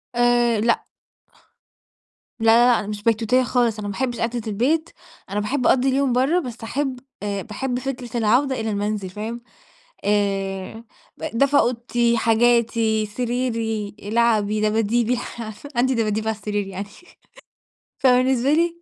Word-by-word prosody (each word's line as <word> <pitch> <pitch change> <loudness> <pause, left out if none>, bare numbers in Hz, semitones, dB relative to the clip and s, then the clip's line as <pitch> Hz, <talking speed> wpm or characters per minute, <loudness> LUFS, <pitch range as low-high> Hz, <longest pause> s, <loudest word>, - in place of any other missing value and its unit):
آآ، 240 -2 +3
لأ. 235 +2 +1 1.5
لا، 225 - -2
لا، 235 +2 +6
لأ، - - +2
أنا 205 - -5
مش 205 -1 -5
بيتوتية 230 +3 +2
خالص، 240 -2 +1
أنا 205 - -4
مابحبش 240 +4 -2
قاعدة 235 0 -2
البيت، 270 +11 0 0.4
أنا 205 +2 -1
باحب 250 +5 0
أقضي 265 +1 +3
اليوم 265 -1 +1
برّه، 270 +8 +2
بس 250 -8 -6
أحب 265 +1 -2 0.2
آآ 200 -1 -2
باحب 245 +3 -3
فكرة 250 -3 -5
العودة 250 +4 +2
إلى 220 0 -2
المنزل، 205 -2 -2
فاهم؟ 220 +5 -6 0.6
آآ 200 +1 -1 0.3
ب - - -8
دفى 280 +1 +3
أوضتي، 235 -1 +1
حاجاتي، 230 -1 +2
سريري، 225 -2 -2
لعبي، 215 -1 +1
دباديبي، 225 +3 +1 0.6
عندي 260 +2 +2
دباديب 220 -1 -1
على 220 - -1
السرير 205 -1 -3
يعني 195 +1 -6 1.1
فبالنسبة 255 +1 +3
لي 340 +1 +1
230 Hz, 135 wpm, -22 LUFS, 210-250 Hz, 1.5 s, لا